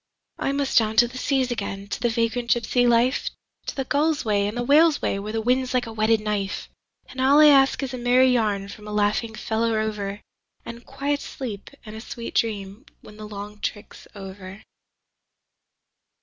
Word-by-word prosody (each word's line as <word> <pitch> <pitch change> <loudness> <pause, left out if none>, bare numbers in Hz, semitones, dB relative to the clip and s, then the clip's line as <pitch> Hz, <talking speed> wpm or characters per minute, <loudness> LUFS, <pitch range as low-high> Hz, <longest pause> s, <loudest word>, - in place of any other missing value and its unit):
I - - 0
must 275 -2 +2
down 220 -1 -1
to 240 +2 +6
the 255 +2 -8
seas 265 -2 0
again 200 -3 -4
to - - -4
the 240 - +2
vagrant 235 +1 -1
gypsy 245 +1 +2
life. 240 +3 +2 0.4
To - - -4
the 270 - -3
gull's 295 +1 0
way 205 -2 +1
and 210 +3 -5
the 240 - -1
whale's 300 +4 +5
way 195 - -1
where 210 +2 -5
the 220 0 -2
wind's 255 +2 +1
like 250 -1 +1
a 225 - -8
whetted 220 0 +2
knife; 205 -2 -3 0.4
And 260 - -6
all 275 +3 +5
I 305 0 +8
ask 275 0 +4
is 265 -1 -4
a 255 - -5
merry 250 +2 +4
yarn 205 -4 0
from 210 +1 -11
a - - -6
laughing 210 +2 0
fellow 225 +1 -1
rover, 210 -2 -3 0.4
And 235 +1 -10
quiet 280 +1 -2
sleep 220 -7 -7 0.2
and 215 0 -9
a 220 - -7
sweet 235 0 -7
dream 210 +3 -2
when 210 - -14
the 215 0 -8
long 210 0 -8
trick's 205 +1 -6
over. 195 +1 -10
230 Hz, 190 wpm, -24 LUFS, 210-255 Hz, 0.4 s, I